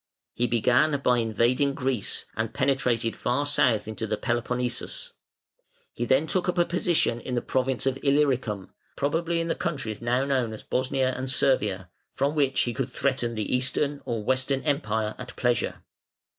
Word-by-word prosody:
He 120 Hz, -, 0 dB
began 125 Hz, +6 st, +3 dB
by 125 Hz, -2 st, +3 dB
invading 120 Hz, +5 st, +2 dB
Greece 125 Hz, -5 st, -1 dB
and 110 Hz, 0 st, -3 dB
penetrated 125 Hz, -4 st, +1 dB
far 125 Hz, +4 st, 0 dB
south 125 Hz, -7 st, +2 dB
into 110 Hz, +1 st, -4 dB
the 105 Hz, 0 st, -1 dB
Peloponnesus. 125 Hz, 0 st, -2 dB, 0.8 s
He 120 Hz, -, -2 dB
then 130 Hz, +5 st, +3 dB
took 180 Hz, +2 st, 0 dB
up 180 Hz, -, -1 dB
a 175 Hz, -, +4 dB
position 170 Hz, -8 st, +1 dB
in 125 Hz, -, -4 dB
the 120 Hz, -, +1 dB
province 130 Hz, 0 st, 0 dB
of 135 Hz, 0 st, 0 dB
Illyricum 130 Hz, -9 st, +1 dB, 0.2 s
probably 165 Hz, +4 st, 0 dB
in 165 Hz, -, -1 dB
the 165 Hz, -, +1 dB
countries 135 Hz, -9 st, -3 dB
now 125 Hz, +3 st, +1 dB
known 130 Hz, -5 st, 0 dB
as 110 Hz, -, -9 dB
Bosnia 130 Hz, 0 st, 0 dB
and 130 Hz, +1 st, -3 dB
Servia 105 Hz, -9 st, +1 dB, 0.3 s
from 140 Hz, +2 st, +1 dB
which 140 Hz, -3 st, +2 dB
he 120 Hz, -, 0 dB
could -, -, -2 dB
threaten 125 Hz, -4 st, -1 dB
the 110 Hz, +3 st, -1 dB
Eastern 140 Hz, +3 st, 0 dB
or 115 Hz, -3 st, -3 dB
Western 130 Hz, +3 st, 0 dB
Empire 110 Hz, -8 st, 0 dB
at 125 Hz, 0 st, -8 dB
pleasure. 120 Hz, -1 st, 0 dB
130 Hz, 165 wpm, -26 LUFS, 115-140 Hz, 0.8 s, a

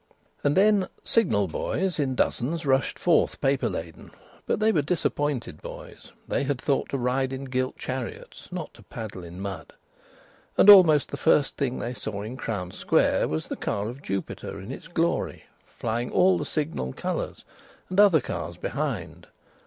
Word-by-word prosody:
And 145 Hz, +4 st, +2 dB
then 200 Hz, -1 st, +4 dB, 0.2 s
Signal 135 Hz, -, +2 dB
boys 175 Hz, -, -2 dB
in 135 Hz, -3 st, 0 dB
dozens 155 Hz, +7 st, 0 dB
rushed 135 Hz, -1 st, +2 dB
forth -, -, +2 dB
paper 135 Hz, 0 st, +1 dB
laden, 80 Hz, -1 st, -7 dB, 0.4 s
but -, -, +1 dB
they 220 Hz, +1 st, +4 dB
were 160 Hz, -, +2 dB
disappointed 145 Hz, -, -1 dB
boys; -, -, -10 dB, 0.2 s
they -, -, 0 dB
had 140 Hz, -2 st, -1 dB
thought 140 Hz, +1 st, 0 dB
to 140 Hz, -, -1 dB
ride 130 Hz, +1 st, 0 dB
in 135 Hz, +1 st, -4 dB
gilt 130 Hz, -1 st, -2 dB
chariots, 130 Hz, -2 st, -6 dB
not -, -, -5 dB
to -, -, -16 dB
paddle 105 Hz, -5 st, -7 dB
in 85 Hz, +1 st, -9 dB
mud. 95 Hz, -4 st, -6 dB, 0.8 s
And 205 Hz, -, +10 dB
almost 160 Hz, -7 st, +7 dB
the -, -, -4 dB
first 150 Hz, -3 st, +3 dB
thing 130 Hz, -3 st, -1 dB
they 120 Hz, -, -3 dB
saw 105 Hz, -3 st, -5 dB
in 115 Hz, +4 st, -6 dB
Crown 100 Hz, -8 st, -4 dB
Square -, -, +2 dB
was 80 Hz, 0 st, -3 dB
the -, -, -4 dB
car 100 Hz, +2 st, -2 dB
of 130 Hz, +4 st, -9 dB
Jupiter 95 Hz, -2 st, -4 dB
in 100 Hz, +5 st, -8 dB
its 135 Hz, -, -8 dB
glory, 170 Hz, -1 st, -1 dB, 0.2 s
flying 120 Hz, +1 st, -3 dB
all 185 Hz, 0 st, +4 dB
the -, -, -3 dB
Signal 150 Hz, -, -2 dB
colours; -, -, -4 dB, 0.4 s
and 185 Hz, +2 st, -1 dB
other 195 Hz, -8 st, +7 dB
cars -, -, -5 dB
behind. -, -, -4 dB
130 Hz, 170 wpm, -26 LUFS, 110-160 Hz, 0.8 s, And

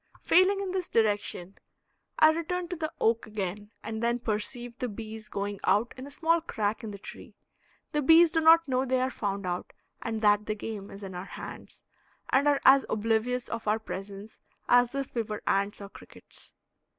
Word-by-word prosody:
Failing 370 Hz, +3 st, +4 dB
in 385 Hz, -2 st, -3 dB
this 370 Hz, -2 st, -3 dB
direction, 205 Hz, -4 st, 0 dB, 0.6 s
I 310 Hz, 0 st, +7 dB
return 345 Hz, +2 st, -3 dB
to 360 Hz, -, -3 dB
the 315 Hz, -1 st, -3 dB
oak 225 Hz, 0 st, +1 dB
again, 205 Hz, -1 st, -4 dB
and 220 Hz, 0 st, -4 dB
then 235 Hz, +1 st, +1 dB
perceive 240 Hz, +2 st, -3 dB
the 250 Hz, -, -2 dB
bees 220 Hz, 0 st, -8 dB
going 200 Hz, 0 st, -3 dB
out 210 Hz, +5 st, +2 dB
in 260 Hz, +1 st, -8 dB
a -, -, -9 dB
small 330 Hz, +2 st, +1 dB
crack 215 Hz, -8 st, -2 dB
in 220 Hz, -, -5 dB
the 200 Hz, -, -7 dB
tree. 200 Hz, -, -11 dB, 0.6 s
The 300 Hz, -, 0 dB
bees 325 Hz, +3 st, +7 dB
do 325 Hz, -1 st, +2 dB
not 330 Hz, +1 st, +6 dB
know 260 Hz, -1 st, +1 dB
they 260 Hz, -1 st, +1 dB
are 260 Hz, +1 st, 0 dB
found 200 Hz, -4 st, -3 dB
out 180 Hz, 0 st, -4 dB, 0.3 s
and 225 Hz, -1 st, -3 dB
that 210 Hz, 0 st, +3 dB
the 215 Hz, -, -1 dB
game 205 Hz, -2 st, -6 dB
is 200 Hz, +1 st, -10 dB
in 190 Hz, -1 st, -7 dB
our 180 Hz, +1 st, -6 dB
hands, -, -, -10 dB, 0.5 s
and 280 Hz, +2 st, +3 dB
are 285 Hz, -1 st, +4 dB
as 270 Hz, 0 st, +8 dB
oblivious 225 Hz, +3 st, 0 dB
of 225 Hz, -, -5 dB
our 210 Hz, +1 st, +3 dB
presence 200 Hz, 0 st, -8 dB, 0.3 s
as 245 Hz, +1 st, +4 dB
if 275 Hz, -1 st, -3 dB
we 235 Hz, -, 0 dB
were 210 Hz, -1 st, -6 dB
ants 200 Hz, +1 st, 0 dB
or 200 Hz, -, -8 dB
crickets. -, -, -11 dB
225 Hz, 195 wpm, -28 LUFS, 205-275 Hz, 0.6 s, as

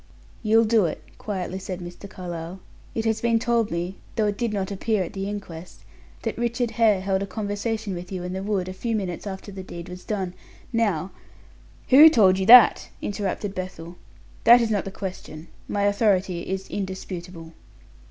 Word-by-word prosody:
"You'll 225 Hz, +1 st, +4 dB
do 220 Hz, -3 st, +3 dB
it," 160 Hz, -, -3 dB, 0.2 s
quietly 190 Hz, -2 st, -4 dB
said 185 Hz, -1 st, -6 dB
Mr. 175 Hz, +3 st, -9 dB
Carlyle. 175 Hz, 0 st, -7 dB, 0.4 s
"It 225 Hz, -, -1 dB
has 225 Hz, -1 st, 0 dB
been 235 Hz, -1 st, +3 dB
told 230 Hz, -1 st, +1 dB
me, 175 Hz, +3 st, -3 dB, 0.2 s
though 220 Hz, -, +2 dB
it 205 Hz, -1 st, -1 dB
did 235 Hz, -2 st, 0 dB
not 195 Hz, -2 st, -2 dB
appear 200 Hz, +1 st, 0 dB
at 170 Hz, -, -8 dB
the 195 Hz, 0 st, -3 dB
inquest, 180 Hz, -5 st, -8 dB, 0.4 s
that -, -, -3 dB
Richard 240 Hz, 0 st, -1 dB
Hare 215 Hz, -5 st, +3 dB
held 190 Hz, 0 st, 0 dB
a 200 Hz, -, -3 dB
conversation 205 Hz, +1 st, -3 dB
with 180 Hz, +1 st, -7 dB
you 185 Hz, -2 st, -4 dB
in 180 Hz, 0 st, -4 dB
the 190 Hz, -, -3 dB
wood 195 Hz, -2 st, -1 dB
a 185 Hz, -, -5 dB
few 225 Hz, +5 st, -2 dB
minutes 190 Hz, -2 st, -4 dB
after 195 Hz, +1 st, -7 dB
the 190 Hz, -1 st, -7 dB
deed 170 Hz, -2 st, -9 dB
was 180 Hz, 0 st, -9 dB
done. 190 Hz, -4 st, -3 dB, 0.4 s
Now 195 Hz, -6 st, 0 dB, 0.4 s
" -, -, -27 dB
"Who 295 Hz, +5 st, +10 dB
told 195 Hz, -10 st, +4 dB
you 190 Hz, -, -1 dB
that?" 245 Hz, -1 st, +8 dB
interrupted 200 Hz, 0 st, -3 dB
Bethel. 180 Hz, -2 st, -7 dB, 0.5 s
"That 240 Hz, +2 st, +8 dB
is 230 Hz, -2 st, 0 dB
not 205 Hz, -2 st, 0 dB
the 195 Hz, -, -5 dB
question. 180 Hz, -5 st, -7 dB, 0.2 s
My 205 Hz, -, -1 dB
authority 195 Hz, -4 st, +1 dB
is 190 Hz, 0 st, -3 dB
indisputable." 180 Hz, -4 st, -6 dB
195 Hz, 185 wpm, -24 LUFS, 185-215 Hz, 0.5 s, Who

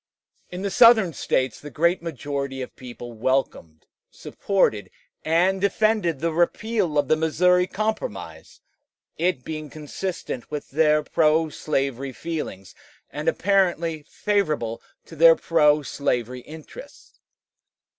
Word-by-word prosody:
In 180 Hz, +2 st, -6 dB
the 200 Hz, -, -2 dB
Southern 220 Hz, -6 st, +6 dB
States 130 Hz, -2 st, -1 dB
the 150 Hz, -, -9 dB
great 170 Hz, +4 st, +1 dB
majority 140 Hz, -4 st, -4 dB
of -, -, -11 dB
people 120 Hz, -1 st, -9 dB
welcomed, 110 Hz, -, -2 dB, 0.2 s
supported, 110 Hz, -, -1 dB, 0.3 s
and 180 Hz, +4 st, +2 dB
defended 200 Hz, -5 st, +1 dB
the 165 Hz, 0 st, 0 dB
repeal 175 Hz, 0 st, 0 dB
of 145 Hz, -2 st, +2 dB
the 155 Hz, -, +4 dB
Missouri 180 Hz, +3 st, +2 dB
Compromise, 220 Hz, -, -5 dB, 0.6 s
it 170 Hz, -6 st, 0 dB
being 155 Hz, 0 st, -6 dB
consonant 155 Hz, -3 st, -6 dB
with 150 Hz, -1 st, -6 dB
their 150 Hz, +1 st, +3 dB
pro 160 Hz, +1 st, +2 dB
slavery 135 Hz, -3 st, -2 dB
feelings, 150 Hz, -, -6 dB, 0.4 s
and 150 Hz, +3 st, -6 dB
apparently 175 Hz, -5 st, +1 dB
favorable 155 Hz, -, -1 dB, 0.2 s
to 165 Hz, -, -12 dB
their 165 Hz, +1 st, +7 dB
pro 150 Hz, -3 st, +3 dB
slavery 125 Hz, -3 st, -2 dB
interests. 160 Hz, -, -13 dB
155 Hz, 115 wpm, -24 LUFS, 140-180 Hz, 0.6 s, their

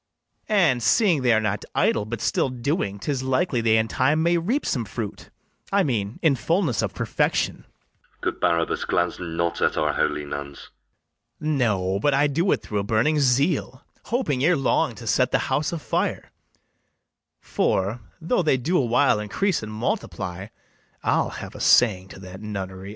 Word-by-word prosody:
] -, -, -49 dB
And, 175 Hz, -, +3 dB
seeing 155 Hz, -, +3 dB
they 125 Hz, -2 st, +3 dB
are 110 Hz, -, +4 dB
not 105 Hz, -2 st, -2 dB
idle, 105 Hz, -, +2 dB
but 110 Hz, 0 st, -5 dB
still 135 Hz, -, +1 dB
doing, 125 Hz, -, -2 dB
'Tis 135 Hz, +5 st, -2 dB
likely 130 Hz, 0 st, 0 dB
they 110 Hz, -1 st, +3 dB
in 110 Hz, 0 st, +1 dB
time 150 Hz, +7 st, +1 dB
may 170 Hz, +1 st, +3 dB
reap 235 Hz, -, -1 dB
some 125 Hz, -, -1 dB
fruit, 105 Hz, 0 st, -6 dB, 0.4 s
I 200 Hz, 0 st, +3 dB
mean, 110 Hz, -, -2 dB
in 160 Hz, -4 st, +5 dB
fullness 150 Hz, -, 0 dB
of 100 Hz, -4 st, -3 dB
perfection. -, -, -1 dB
LODOWICK. -, -, -39 dB
Good -, -, -2 dB
Barabas, 85 Hz, 0 st, +1 dB
glance -, -, 0 dB
not 85 Hz, 0 st, -2 dB
at -, -, +1 dB
our -, -, +1 dB
holy 75 Hz, -, -1 dB
nuns. 70 Hz, -1 st, -7 dB, 0.7 s
BARABAS. 155 Hz, -1 st, -1 dB
No, 100 Hz, -5 st, +1 dB
but 140 Hz, +6 st, +2 dB
I 140 Hz, +2 st, +3 dB
do 165 Hz, +6 st, +1 dB
it -, -, 0 dB
through 105 Hz, -, -2 dB
a -, -, -1 dB
burning 115 Hz, +9 st, +1 dB
zeal, 140 Hz, 0 st, +1 dB, 0.2 s
Hoping 200 Hz, -, -1 dB
ere 170 Hz, +2 st, +4 dB
long 135 Hz, -, +1 dB
to -, -, -10 dB
set -, -, +2 dB
the -, -, +2 dB, 0.2 s
house 145 Hz, +3 st, 0 dB
a 170 Hz, -, -3 dB
fire; 155 Hz, -, -2 dB, 1.1 s
For, 100 Hz, +5 st, -1 dB, 0.2 s
though 175 Hz, +7 st, 0 dB
they 155 Hz, -5 st, +2 dB
do 165 Hz, +9 st, +1 dB
a 135 Hz, -, +1 dB
while 120 Hz, -1 st, +3 dB
increase 165 Hz, -, -1 dB
and 110 Hz, 0 st, -7 dB
multiply, 105 Hz, -, -3 dB, 0.6 s
I'll -, -, +1 dB
have -, -, -8 dB
a -, -, -10 dB
saying 95 Hz, -6 st, +4 dB
to 95 Hz, -, -12 dB
that 95 Hz, +1 st, -10 dB
nunnery. 95 Hz, -2 st, -6 dB
120 Hz, 180 wpm, -24 LUFS, 100-150 Hz, 1.1 s, in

